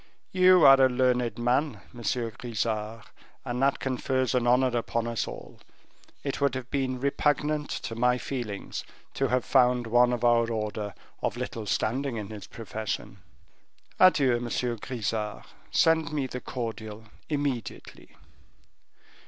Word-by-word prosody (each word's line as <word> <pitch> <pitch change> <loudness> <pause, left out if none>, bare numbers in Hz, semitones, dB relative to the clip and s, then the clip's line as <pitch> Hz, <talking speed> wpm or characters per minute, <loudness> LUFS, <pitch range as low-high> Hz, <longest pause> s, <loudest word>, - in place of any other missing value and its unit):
You 185 -3 +6
are 135 0 +8
a 130 - +6
learned 125 -1 +1
man, 125 +5 0
Monsieur 120 -1 -2
Grisart, 110 -2 -3 0.4
and 125 +1 -3
that 135 0 +3
confers 130 0 -1
an 125 -1 +1
honor 125 0 +3
upon 115 0 -1
us 115 -2 -2
all; - - -9 0.6
it 140 0 -3
would 140 -2 +2
have 130 -1 -6
been 130 -2 -1
repugnant 150 +2 0
to 115 - -4
my 125 +2 +2
feelings 120 -6 -5 0.3
to 135 - 0
have 125 0 0
found 125 -2 +3
one 120 +2 +4
of 120 -1 -2
our 120 -1 +4
order 105 -2 -3 0.3
of - - -1
little 110 -2 -5
standing 125 +5 -1
in 105 -2 -5
his 105 -2 -8
profession. 110 -2 -5 0.8
Adieu, 140 -10 +5
Monsieur 120 0 -2
Grisart; 110 -2 -4 0.2
send 160 -1 +3
me 145 -3 -1
the 125 -1 -6
cordial 110 -3 -6 0.3
immediately." 140 -6 -4
125 Hz, 135 wpm, -27 LUFS, 115-135 Hz, 0.8 s, are